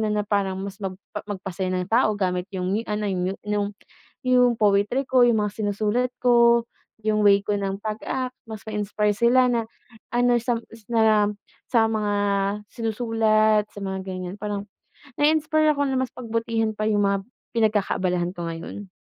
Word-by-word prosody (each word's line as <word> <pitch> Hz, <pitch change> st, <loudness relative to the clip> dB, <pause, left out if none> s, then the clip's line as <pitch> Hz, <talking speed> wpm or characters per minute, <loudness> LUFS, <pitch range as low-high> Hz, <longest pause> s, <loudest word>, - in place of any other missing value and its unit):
na 215 Hz, -, 0 dB
na 210 Hz, -, +1 dB
parang 200 Hz, -2 st, 0 dB
mas 200 Hz, 0 st, -7 dB
magpa 190 Hz, -1 st, -6 dB
magpasaya 190 Hz, -2 st, -4 dB
ng 180 Hz, +2 st, -3 dB
tao 225 Hz, -3 st, +4 dB
gamit 180 Hz, -2 st, -1 dB
yung 180 Hz, 0 st, -2 dB
new, 220 Hz, +3 st, -1 dB
ano 210 Hz, 0 st, -2 dB
yu 185 Hz, +1 st, -1 dB
yung 205 Hz, -1 st, 0 dB, 0.6 s
yung 250 Hz, -2 st, +4 dB
poetry 210 Hz, +6 st, +2 dB
ko, 255 Hz, -1 st, +4 dB
yung 240 Hz, -2 st, +5 dB
mga 205 Hz, -, -4 dB
sinusulat 215 Hz, +4 st, 0 dB
ko, 235 Hz, -1 st, +4 dB, 0.4 s
yung 215 Hz, -1 st, +2 dB
way 200 Hz, -1 st, +5 dB
ko 205 Hz, -, 0 dB
ng 195 Hz, -1 st, -2 dB
pag-act 235 Hz, +4 st, -3 dB, 0.2 s
mas 215 Hz, -1 st, -6 dB
ma-inspire 210 Hz, 0 st, 0 dB
sila 245 Hz, +3 st, +4 dB
na 235 Hz, -2 st, +1 dB, 0.5 s
ano 245 Hz, 0 st, +3 dB
sam 240 Hz, -1 st, 0 dB
s 225 Hz, -, -14 dB
sam 215 Hz, -3 st, +3 dB, 0.3 s
sa 230 Hz, -3 st, +4 dB
mga 210 Hz, -2 st, -1 dB, 0.6 s
sinusulat 220 Hz, -2 st, +2 dB
sa 205 Hz, -, -10 dB
mga 190 Hz, -1 st, -4 dB
ganyan 185 Hz, 0 st, -5 dB
parang 205 Hz, 0 st, -4 dB, 0.5 s
nai-inspire 310 Hz, 0 st, +3 dB
ako 285 Hz, -, 0 dB
na 265 Hz, -, 0 dB
mas 260 Hz, -2 st, -2 dB
pagbutihan 230 Hz, -2 st, -1 dB
pa 215 Hz, -, -1 dB
yung 210 Hz, -1 st, +2 dB
mga 200 Hz, 0 st, +2 dB, 0.4 s
pinagkakaabalahan 190 Hz, -5 st, +1 dB
ko 175 Hz, -, -4 dB
ngayon. 165 Hz, +5 st, -6 dB
215 Hz, 165 wpm, -24 LUFS, 200-235 Hz, 0.6 s, yung